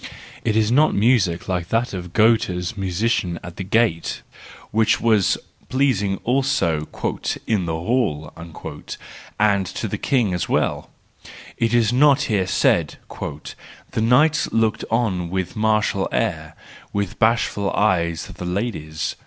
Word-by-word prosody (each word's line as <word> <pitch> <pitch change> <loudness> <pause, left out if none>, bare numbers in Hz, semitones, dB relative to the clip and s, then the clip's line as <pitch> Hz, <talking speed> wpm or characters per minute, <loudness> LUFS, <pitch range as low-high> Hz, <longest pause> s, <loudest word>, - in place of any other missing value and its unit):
It 110 -2 0
is 110 0 +2
not 150 +5 +4
music 100 -6 +2
like 90 -2 -2
that 115 +1 0
of 90 -2 -6
Goethe's 105 -3 +2
musician 95 -2 -1
at 85 -1 -9
the 95 - -3
gate, 100 -4 0 0.5
which 110 +1 +2
was 110 -5 +3 0.3
pleasing 120 -8 +1
also 120 - +1 0.6
"in 100 -6 0
the 80 - -1
hall/ 80 - -1
1 85 -2 -9 0.6
and 100 -3 +3
to - - -4
the - - -4
king 120 -9 +1
as 90 - -2
well; - - 0 0.7
it 115 +1 +1
is 115 -1 +3
not 140 +1 +5
here 100 -8 0
said: - - +2
" - - -34 0.8
The - - -1
knights 145 +7 +3
looked 110 -1 +1
on 100 -7 0
with 95 0 -3
martial 105 -3 +1
air; - - -2 0.4
with 100 -2 -3
bashful 110 -3 +2
eyes 85 -6 +1
the - - -9
ladies." 90 -5 -3
105 Hz, 135 wpm, -21 LUFS, 90-115 Hz, 0.8 s, not